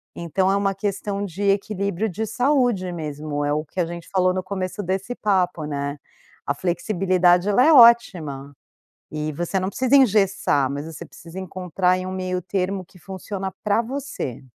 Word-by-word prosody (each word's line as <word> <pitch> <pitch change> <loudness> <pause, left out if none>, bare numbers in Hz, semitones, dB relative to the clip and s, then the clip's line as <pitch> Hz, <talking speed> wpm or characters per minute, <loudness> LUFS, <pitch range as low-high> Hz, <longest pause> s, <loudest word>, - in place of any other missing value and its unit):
Então 180 +3 0
é - - +2
uma 195 -1 +1
questão 200 0 -3
de 195 +1 -5
equilíbrio 200 0 0
de 220 +5 -3
saúde 245 -5 +1
mesmo. 150 -2 -4
É 145 - +1
o 155 +1 -1
que 160 - -8
a 175 - +2
gente 170 0 -8
falou 185 -1 +2
no 185 - -2
começo 185 +1 -4
desse 190 +6 -3
papo, 180 -7 0
né, 145 -1 -3 0.5
a 140 - 0
flexibilidade, 180 +1 +2
ela 210 +5 +4
é 320 - +6
ótima. 180 - +5 0.6
E 155 0 -3
você 175 +5 -2
não 185 - -1
precisa 260 +4 +3
engessar, 195 - +3
mas 145 +1 -4
você 160 - -8
precisa 170 +2 -12
encontrar 185 0 0
em 185 - -5
um 185 - -4
meio 185 -1 -2
termo 190 +1 -2
que 180 - -20
funciona 190 +1 -6
para 210 +2 +2
você. 260 - -5
185 Hz, 175 wpm, -22 LUFS, 170-200 Hz, 0.6 s, é